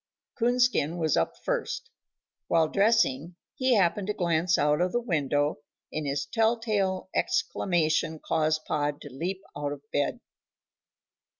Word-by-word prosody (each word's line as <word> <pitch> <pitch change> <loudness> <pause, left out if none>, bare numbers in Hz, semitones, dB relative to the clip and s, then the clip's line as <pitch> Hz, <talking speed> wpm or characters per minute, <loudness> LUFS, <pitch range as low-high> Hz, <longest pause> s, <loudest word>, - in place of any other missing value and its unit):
Coonskin 245 - +2
was 160 -3 +1
up 80 - 0
first. - - -2 0.6
While 160 -2 +3
dressing 190 - +2 0.2
he 260 -2 +2
happened 195 0 +2
to 210 - 0
glance 170 -1 +2
out 150 +2 +2
of 180 0 0
the 240 - +2
window 145 - 0 0.3
and 155 -2 -2
his 140 0 -1
tell 225 +9 +2
tale 200 -5 -1
exclamation 160 -3 +1
caused 155 0 0
Pod 145 -1 -1
to 145 - -10
leap 185 +7 -3
out 145 0 -2
of 140 -1 -11
bed. 145 - 0
165 Hz, 135 wpm, -27 LUFS, 145-200 Hz, 0.6 s, While